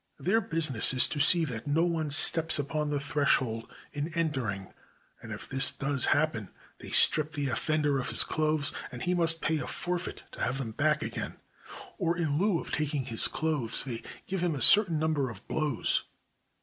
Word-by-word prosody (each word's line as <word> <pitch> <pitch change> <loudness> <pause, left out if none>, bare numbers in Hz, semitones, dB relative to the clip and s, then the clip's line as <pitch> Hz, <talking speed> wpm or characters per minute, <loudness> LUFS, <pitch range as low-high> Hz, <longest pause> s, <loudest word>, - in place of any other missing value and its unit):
Their 220 +5 0
business 155 - +2
is 130 - +5
to 150 - -5
see 165 +2 +4
that 120 -4 -6
no 155 +3 +1
one 165 -3 -2
steps 160 +2 +5
upon 150 +1 -3
the 145 -1 -2
threshold 135 -5 -1 0.2
in 145 +3 -4
entering; 130 - -3 0.5
and - - -10
if - - -8
this 135 +1 +4
does 140 -1 0
happen, 135 - 0 0.3
they - - -9
strip 155 0 +3
the 145 -3 -3
offender 145 +3 -1
of 125 - -4
his - - +5
clothes, 155 -2 +1 0.2
and 125 -1 -8
he 180 - 0
must 165 -2 +2
pay 155 0 -1
a - - -6
forfeit 180 0 -5
to - - -10
have 130 +3 -1
them 125 -5 -5
back 150 +6 0
again; - - -5 0.6
or 170 -2 -1
in 155 -3 -1
lieu 195 -3 +1
of - - -9
taking 150 -3 -2
his 115 -3 +1
clothes, 150 -8 -1
they 120 -4 -6 0.2
give 190 -2 -4
him 175 -3 -1
a 135 - -6
certain 195 - +5
number 150 -4 -1
of 105 -4 -12
blows. 150 -6 0
150 Hz, 190 wpm, -28 LUFS, 135-160 Hz, 0.6 s, is